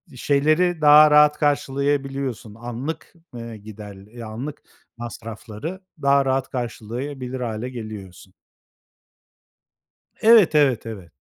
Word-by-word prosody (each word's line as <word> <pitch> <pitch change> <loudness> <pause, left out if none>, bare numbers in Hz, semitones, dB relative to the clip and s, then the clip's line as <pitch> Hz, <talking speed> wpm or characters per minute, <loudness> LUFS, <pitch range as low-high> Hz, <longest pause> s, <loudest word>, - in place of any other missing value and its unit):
şeyleri 155 +6 +1
daha 150 0 +8
rahat 150 0 +6
karşılayabiliyorsun 140 -5 -1
anlık, 120 +7 -6 0.2
eee, 115 -2 -7
gider 105 -1 -11 0.2
e - - -6
anlık 125 +7 -7 0.4
masrafları 115 - -7 0.2
daha 140 0 +3
rahat 130 0 0
karşılayabilir 125 +2 -5
hâle 115 +1 -4
geliyorsun. 100 -6 -9 1.9
Evet, 220 -7 +6
evet, 135 -7 +3
evet. 95 -7 -9
130 Hz, 95 wpm, -22 LUFS, 110-145 Hz, 1.9 s, daha